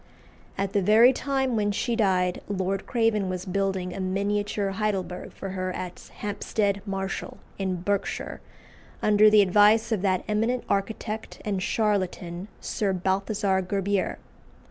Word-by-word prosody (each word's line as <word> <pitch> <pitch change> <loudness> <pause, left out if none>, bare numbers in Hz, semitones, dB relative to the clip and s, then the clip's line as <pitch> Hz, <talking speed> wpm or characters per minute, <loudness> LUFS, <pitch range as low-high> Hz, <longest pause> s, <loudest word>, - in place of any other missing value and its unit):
At 195 0 -2
the 200 - +3
very 225 +6 +6
time 265 -2 0
when 205 -1 +1
she 235 +4 -1
died 185 -5 +1
Lord 195 -1 -2
Craven 225 -5 +1
was 185 0 -4
building 190 -1 -1
a - - -6
miniature 200 +1 -1
Heidelberg 195 -3 -2
for 195 - -7
her 185 0 -3
at 180 -1 -7
Hampstead 205 0 -1
Marshall, 195 0 -4 0.2
in 185 -2 -2
Berkshire, 200 0 -2 0.6
under 210 0 +6
the 210 -1 +7
advice 210 +4 +4
of 215 -4 +1
that 185 -2 +1
eminent 225 +4 0
architect 215 +2 -3
and 200 -3 -1
charlatan, 185 -4 -1
Sir 200 -3 -1
Balthasar 190 +1 0
Gerbier. 195 +1 -1
200 Hz, 135 wpm, -26 LUFS, 190-210 Hz, 0.6 s, the